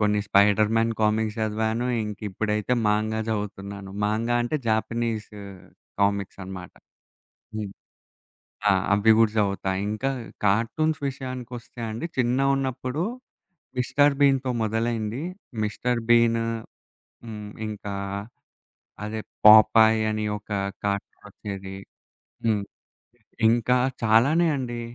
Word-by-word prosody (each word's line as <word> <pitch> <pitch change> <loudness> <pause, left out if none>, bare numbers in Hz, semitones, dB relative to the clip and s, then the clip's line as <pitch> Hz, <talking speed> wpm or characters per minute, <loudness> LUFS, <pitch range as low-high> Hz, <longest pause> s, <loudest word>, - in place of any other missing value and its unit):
కొన్ని 105 0 +2
'Spiderman' 105 +3 +3
comics 110 +1 +1
చదివాను. 110 +2 -1 0.2
ఇంకిప్పుడైతే 105 +2 -2 0.2
manga 110 +1 +1
చదువుతున్నాను. 100 -2 -5
మాంగా 115 +3 0
అంటే 135 +6 -1
జాపనీస్ 110 0 -1 0.7
కామిక్సనమాట. 95 -2 -2 0.8
హ్మ్. 105 -2 -4 1.0
ఆ! - - +6 0.2
అవ్వి 105 +2 +5
గుడా 115 -2 +4
చదువుతా. 100 -2 0 0.2
ఇంకా 110 +6 -1 0.4
కార్టూన్స్ 115 +10 +1
విషయాకొస్తే 125 -2 -8
అండి 110 +9 -4
చిన్నగున్నప్పుడు 130 +2 0 0.8
'మిస్టర్ 145 +3 +3
బీన్‌తో' 135 -2 +3
మొదలైంది. 110 +2 -1 0.4
మిస్టర్ 120 +3 -1
బీనూ 115 -1 +4 0.8
హ్మ్. 105 -2 -7 0.2
ఇంకా 105 -1 -6 1.1
అదే 110 +1 -4 0.2
'పొపాయ్' 110 +1 +8
అని 110 0 -2
ఒక 105 - -19 0.4
కార్టూనొచ్చేది. 100 -1 -5 0.7
హ్మ్. 105 -3 +2 0.9
ఇంకా 120 +2 +3 0.3
చాలానే 135 +10 +4
అండి. 120 -3 -4
110 Hz, 90 wpm, -25 LUFS, 105-120 Hz, 1.1 s, పొపాయ్